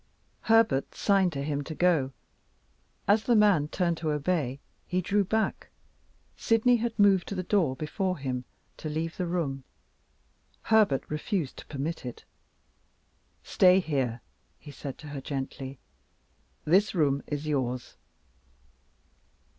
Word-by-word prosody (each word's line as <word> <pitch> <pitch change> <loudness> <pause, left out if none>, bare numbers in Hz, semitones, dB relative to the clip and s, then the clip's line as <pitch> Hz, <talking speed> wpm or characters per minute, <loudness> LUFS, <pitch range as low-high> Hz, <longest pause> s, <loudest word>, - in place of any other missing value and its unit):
Herbert 225 -12 +3
signed 195 -3 +3
to 140 -1 -3
him 145 -1 -2
to 155 +2 -7
go. 160 -7 +2 1.0
As 210 +2 +3
the 240 - +4
man 200 -9 +4
turned 170 +1 0
to 160 -1 -2
obey, 150 -3 -1 0.3
he 180 - 0
drew 200 +3 +1
back. 220 +3 -1 0.7
Sydney 235 +2 +3
had 230 0 -3
moved 200 -3 +4
to 200 - -4
the 185 - -2
door 175 -8 +1
before 185 +5 -2
him, 130 -3 -3 0.3
to 155 - -5
leave 160 +2 -3
the 180 - -2
room. 150 -6 -2 1.0
Herbert 215 -12 +3
refused 150 0 -3
to - - -11
permit 155 +4 -4
it. 125 -2 -8 1.2
"Stay 185 0 +5
here," 135 - -1 0.4
he 145 - -12
said 140 -1 -7
to 150 - -10
her 145 -2 -6
gently; 135 -1 -5 0.9
"this 190 +6 +3
room 140 -4 +2
is 145 0 -3
yours." 130 -5 -2
160 Hz, 130 wpm, -28 LUFS, 140-195 Hz, 1.2 s, Stay